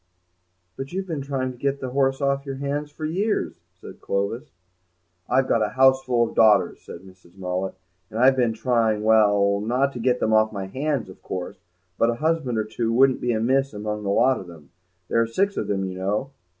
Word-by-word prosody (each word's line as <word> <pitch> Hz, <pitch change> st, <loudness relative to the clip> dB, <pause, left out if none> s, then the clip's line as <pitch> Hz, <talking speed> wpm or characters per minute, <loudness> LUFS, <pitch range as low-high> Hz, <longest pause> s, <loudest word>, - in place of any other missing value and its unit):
"But 135 Hz, 0 st, -6 dB
you've 190 Hz, +1 st, -2 dB
been 160 Hz, -6 st, -4 dB
trying 135 Hz, -2 st, -2 dB
to 125 Hz, -, -13 dB
get 140 Hz, +1 st, -1 dB
the 130 Hz, -1 st, -5 dB
horse 135 Hz, +1 st, +1 dB
off 140 Hz, 0 st, 0 dB
your 135 Hz, -1 st, -5 dB
hands 140 Hz, +2 st, -3 dB
for 155 Hz, +1 st, -7 dB
years," 195 Hz, +7 st, -1 dB, 0.3 s
said -, -, -12 dB
Clovis. 115 Hz, +9 st, -2 dB, 0.8 s
"I've 130 Hz, +1 st, +2 dB
got 115 Hz, -, +2 dB
a 105 Hz, -, +1 dB
houseful 130 Hz, -3 st, +4 dB
of -, -, -9 dB
daughters," 110 Hz, -3 st, +4 dB
said 85 Hz, -, -10 dB
Mrs. 95 Hz, -1 st, -18 dB
Mullet, 95 Hz, 0 st, -3 dB, 0.3 s
"and 110 Hz, -, -7 dB
I've 130 Hz, +3 st, +5 dB
been 120 Hz, -3 st, +1 dB
trying—well, 110 Hz, -4 st, +2 dB
not 125 Hz, +6 st, 0 dB
to 120 Hz, -, -6 dB
get 125 Hz, +1 st, +1 dB
them 110 Hz, -, +1 dB
off 110 Hz, 0 st, +4 dB
my 100 Hz, -3 st, -5 dB
hands, 135 Hz, +5 st, -2 dB
of 95 Hz, -, -14 dB
course, 95 Hz, +2 st, -6 dB, 0.4 s
but 115 Hz, -, +4 dB
a 120 Hz, -, 0 dB
husband 155 Hz, -4 st, 0 dB
or 110 Hz, -, 0 dB
two 115 Hz, +1 st, -2 dB
wouldn't 130 Hz, +2 st, +3 dB
be 125 Hz, -, 0 dB
amiss 130 Hz, +3 st, +1 dB
among 105 Hz, +1 st, -4 dB
the 100 Hz, -, -3 dB
lot 125 Hz, +5 st, +3 dB
of 95 Hz, -, -10 dB
them; 80 Hz, -5 st, -14 dB, 0.4 s
there 115 Hz, -, +2 dB
are 115 Hz, -, +1 dB
six 195 Hz, -, 0 dB
of -, -, -3 dB
them, 95 Hz, -1 st, -1 dB
you 95 Hz, 0 st, -6 dB
know." 105 Hz, +8 st, -2 dB
120 Hz, 205 wpm, -23 LUFS, 105-135 Hz, 0.8 s, I've